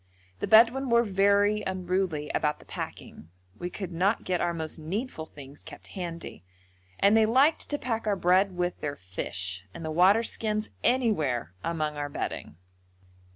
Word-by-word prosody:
The - - -2
Bedouin 240 +4 +5
were 235 0 +5
very 200 +1 +3
unruly 185 -5 -2
about 150 -1 0
the - - -18
packing. 80 - -8 0.3
We 175 - -3
could 185 0 -6
not 190 +6 +1
get 180 -1 -1
our 175 - +1
most 160 -1 -4
needful 165 +1 -4
things 140 -1 -12
kept - - -12
handy, 170 - -7 0.6
and 200 +2 +5
they 220 -1 +5
liked 270 +7 +3
to 290 - 0
pack 225 -5 -3
our 205 - +2
bread 185 +1 +3
with 175 0 -1
their 145 -1 -3
fish, 95 -3 -4
and 165 - -7
the 160 - -3
waterskins 210 +4 +2
anywhere 155 - +1
among 155 -3 -2
our 145 0 -3
bedding. 110 - -5
185 Hz, 155 wpm, -28 LUFS, 155-215 Hz, 0.6 s, Bedouin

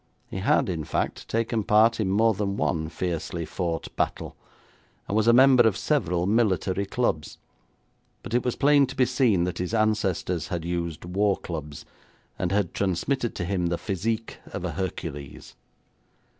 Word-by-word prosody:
He - - -4
had, 95 - +2
in 85 -4 -2
fact, - - -3
taken 115 -1 0
part 110 +3 +4
in 100 -3 0
more 110 +3 +3
than 100 0 -2
one 80 -5 -1
fiercely 85 -1 -3
fought 85 +1 -4
battle, - - -2 0.7
and 100 - -2
was 110 +1 +2
a - - +8
member 130 +1 +7
of 105 - +1
several 90 - 0
military 100 -2 +1
clubs; 95 - -1 0.9
but - - -7
it 120 - +2
was 125 -2 -1
plain 145 -1 +4
to 135 - -8
be 130 - +4
seen 125 -8 +2
that 90 0 -3
his 90 +5 -2
ancestors 100 -6 0
had 85 -2 -4
used 85 -2 -3
war 100 +3 +1
clubs, 75 -4 -7 0.5
and 90 -1 -1
had 100 -3 0
transmitted 110 +7 -1
to 90 - -3
him 90 -1 0
the 85 0 -1
physique 110 +4 -3
of - - -5
a - - -2
Hercules. 85 -7 -6
95 Hz, 165 wpm, -26 LUFS, 85-115 Hz, 0.9 s, a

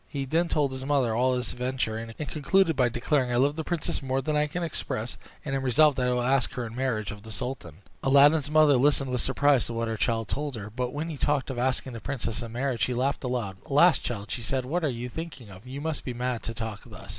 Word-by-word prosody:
He 140 -2 -3
then 165 +6 +1
told 145 -4 +1
his 130 0 -6
mother 135 -5 +1
all 130 +2 +2
his 125 -2 -2
adventure, 125 -3 -2
and 115 0 -6
concluded 165 +3 +2
by 125 -2 +3
declaring, 125 +2 0
"I - - +1
love 140 +4 +3
the 160 - -3
princess 170 -4 -2
more 135 0 -1
than 150 +3 -1
I 150 0 +3
can 175 +4 -3
express, 125 -7 -3 0.3
and 135 -2 -1
am 135 - -1
resolved 145 +3 +4
that 125 - +1
I - - +2
will 125 0 +1
ask 130 0 +2
her 125 - -3
in 115 0 -8
marriage 115 -6 -1
of 105 0 -9
the 110 +1 -10
sultan." 100 - -6 0.2
Aladdin's 140 +2 +5
mother 155 -3 +5
listened 135 0 +3
with 125 -2 0
surprise 140 0 +3
to 120 - -5
what 115 0 -1
her 110 -1 -3
son 115 -1 +1
told 145 +5 -3
her; 105 -1 -7
but 125 +2 -2
when 155 +3 -3
he 150 - -6
talked 140 -1 0
of 125 - -4
asking 130 0 0
the 115 - -6
princess 120 -5 -3
in 115 -1 -6
marriage, 125 0 -2
she 125 - +1
laughed 135 +4 0
aloud. 120 -7 -2
"Alas! 155 +5 +5
child," 105 -4 -5
said 125 +2 -2
she, - - -9
"what 170 +5 -1
are 155 - +2
you 120 -1 -4
thinking 135 -6 -7
of? 95 +5 -13
You 135 +2 -6
must 160 -1 -3
be 125 - -5
mad 125 -1 -2
to 115 - -5
talk 110 -2 -5
thus." - - -12
130 Hz, 260 wpm, -27 LUFS, 120-145 Hz, 0.3 s, Aladdin's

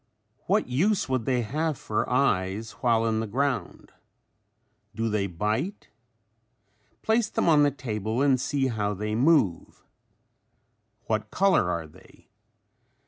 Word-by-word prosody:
What 205 +4 +2
use 180 +11 +1
would 130 -4 -1
they 125 -2 +1
have 150 +5 -2
for - - -2
eyes 95 +5 0
while 115 -2 +2
in 110 -1 0
the 110 - -3
ground? 125 -4 -2 1.0
Do 115 0 -1
they 105 -2 0
bite? 110 - -3 1.1
Place 220 0 +2
them - - -1
on 155 -3 +5
the 145 - +5
table 115 -4 -4
and 135 -3 +3
see 135 0 0
how 105 -5 -1
they 105 +2 -3
move. 125 - +1 1.2
What 110 -1 -2
color 190 - +2
are 85 -2 -2
they? 75 - -19
120 Hz, 130 wpm, -26 LUFS, 105-145 Hz, 1.2 s, on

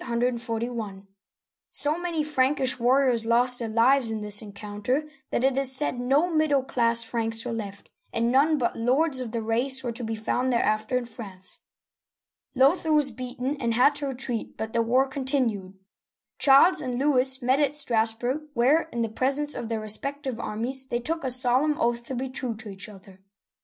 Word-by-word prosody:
So 295 +1 +2
many 340 -3 -2
Frankish 265 -3 +2
warriors 250 -1 +2
lost 245 +2 +3
their 230 - -3
lives 235 +3 +3
in 220 -1 -3
this 210 0 +3
encounter 210 +7 -4 0.2
that - - -1
it 265 -1 +2
is 265 -1 +4
said 260 -3 -1
no 275 +7 +2
middle 310 -5 +1
class 235 -2 +1
Franks 225 0 -2
were 245 - -3
left, 205 -3 -7 0.2
and 230 +1 0
none 295 +4 +3
but 240 -4 -1
lords 260 +5 +1
of 245 -3 -5
that 230 -1 -3
race 250 +4 0
were 240 - -2
to 235 +1 -7
be 225 0 -3
found 250 +4 -1
thereafter 215 0 0
in 250 - -3
France. 195 -6 -5 1.0
Lothair 310 +5 +3
was 295 -3 +3
beaten 255 +3 -4
and 235 -3 -1
had 265 +5 +5
to 285 0 -4
retreat, 255 -3 -5
but 220 0 -5
the 235 - +2
war 250 +4 +2
con 265 0 -5
tinued. 225 -9 -1 0.6
Charles 280 +6 +6
and 250 -2 -3
Louis 265 -1 +2
met 260 +3 +2
at 290 -1 +1
Strassburg, 245 +2 0
where, 285 +8 +3
in 235 - -3
the - - -1
presence 275 +6 -1
of 230 - -6
their 225 -1 -2
respective 260 +4 -3
armies, 255 +6 -2
they 240 - -2
took 325 +6 -3
a 260 - -1
solemn 255 +4 +1
oath 235 0 0
to 260 - -5
be 260 +2 -3
true 255 -3 -4
to 220 0 -10
each 200 +2 -8
other. 190 -2 -15
250 Hz, 180 wpm, -25 LUFS, 230-275 Hz, 1.0 s, Charles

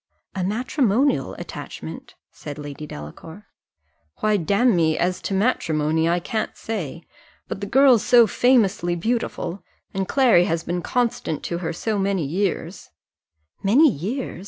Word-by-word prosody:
"A 190 - -3
matrimonial 245 +5 +1
attachment?" - - -8 0.2
said 145 -1 -8
Lady 145 0 -7
Delacour. 160 - -10 0.8
"Why, 215 0 +2
damme, 190 -3 +2
as 180 +1 0
to 195 - -2
matrimony, 160 -7 +1
I 175 +1 +2
can't 215 +5 -3
say; 170 -7 -5 0.4
but 195 - -5
the 200 - -3
girl's 260 -1 +5
so 240 -2 +6
famously 215 -8 +2
beautiful, 195 -2 -2 0.3
and 190 -1 -2
Clary 245 -10 +4
has 165 -1 -1
been 175 +1 -2
constant 240 - -1
to 170 - -3
her 170 - -3
so 210 +5 -2
many 195 -4 0
years 180 +2 -3 0.4
" - - -70 0.3
"Many 260 +10 +5
years! 220 - -4
195 Hz, 135 wpm, -23 LUFS, 165-230 Hz, 0.8 s, so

